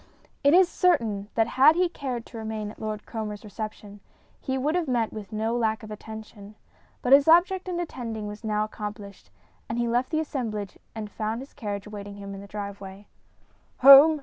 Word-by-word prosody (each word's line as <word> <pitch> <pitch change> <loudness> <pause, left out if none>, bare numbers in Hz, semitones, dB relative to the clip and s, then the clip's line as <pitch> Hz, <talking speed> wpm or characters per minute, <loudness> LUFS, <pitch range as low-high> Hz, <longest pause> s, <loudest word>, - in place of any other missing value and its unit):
It 285 +3 +6
is 370 0 +7
certain 230 - +1
that 225 - +4
had 300 +4 +8
he 360 +1 +3
cared 255 -8 -5
to 235 - -10
remain 220 -1 -4
at - - -16
Lord 215 -1 -4
Cromer's 215 -3 -5
reception, 210 -1 -7 0.4
he 265 -1 -2
would 290 +4 0
have 350 -3 0
met 235 -4 0
with 215 -1 -8
no 220 +2 -1
lack 220 -2 0
of 215 - -9
attention; 215 -1 -10 0.5
but 255 - +4
his 280 +1 +7
object 365 +3 +4
in 350 -1 -2
attending 230 -10 -5
was 210 +2 -8
now 210 -1 0
accomplished, 205 - -7 0.4
and 225 - -2
he 240 0 0
left 245 +2 +1
the 315 - 0
assemblage 225 - -4 0.2
and 215 -2 -6
found 220 +1 -3
his 270 - -12
carriage 205 -6 -5
awaiting 205 -1 -8
him 200 0 -8
in 195 - -8
the 200 - -11
driveway. 200 -1 -7 0.8
"Home!" 280 +4 +9
220 Hz, 190 wpm, -26 LUFS, 210-270 Hz, 0.8 s, Home